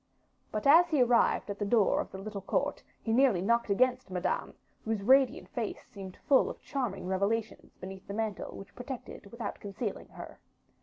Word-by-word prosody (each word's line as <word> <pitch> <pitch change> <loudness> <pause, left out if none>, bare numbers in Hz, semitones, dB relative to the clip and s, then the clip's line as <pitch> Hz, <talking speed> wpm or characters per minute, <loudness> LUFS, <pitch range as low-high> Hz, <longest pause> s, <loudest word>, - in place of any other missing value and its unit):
But 215 - -3
as 325 +5 +7
he 290 -5 +4
arrived 240 -4 +3
at 200 - -7
the - - 0
door 205 -1 +3
of - - -7
the - - -7
little 200 +1 -6
court, 195 - -1 0.2
he 225 - 0
nearly 250 -6 +4
knocked 235 +4 +1
against 250 +3 +2
Madame, 185 0 -2 0.3
whose 220 -3 -2
radiant 265 +3 +4
face 230 -4 -4
seemed 190 -2 -10
full 275 - +5
of - - -8
charming 235 -10 -3
revelations 200 +4 -2
beneath 190 +1 -9
the 200 - -5
mantle 220 -2 -3
which 195 - -11
protected 250 -4 -8
without 235 -3 -5
concealing 205 +1 -5
her. - - -11
220 Hz, 175 wpm, -30 LUFS, 195-245 Hz, 0.3 s, as